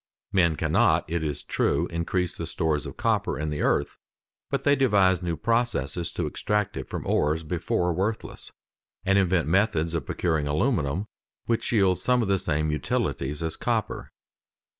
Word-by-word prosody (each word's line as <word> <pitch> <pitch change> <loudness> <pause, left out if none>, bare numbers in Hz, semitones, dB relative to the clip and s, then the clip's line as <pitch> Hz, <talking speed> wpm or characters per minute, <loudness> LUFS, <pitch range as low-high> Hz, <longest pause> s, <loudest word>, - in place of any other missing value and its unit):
Men 85 -5 +3
cannot, - - +2
it 85 0 -2
is 75 -2 -3
true, - - +1
increase 85 +2 -1
the 85 - -5
stores 80 -4 -1
of - - -9
copper - - 0
in 75 0 -2
the 75 - -3
earth, - - 0 0.5
but - - -1
they 145 0 +4
devise 100 - +3
new 85 -2 -2
processes 90 - 0
to 85 - -2
extract 105 +6 -1
it - - -6
from - - -5
ores 75 +2 +1
before 85 +2 0
worthless, 100 +6 -3 0.5
and 95 +1 +4
invent 90 -4 +2
methods 85 -3 +2
of 85 - -2
procuring 80 -4 0
aluminium, 80 - 0 0.4
which 115 -1 -1
yields 95 -5 +3
some 125 -1 +2
of - - -2
the 95 -1 +2
same 75 -3 0
utilities 75 -1 -1
as 80 -1 -2
copper. - - -2
85 Hz, 160 wpm, -26 LUFS, 80-100 Hz, 0.5 s, they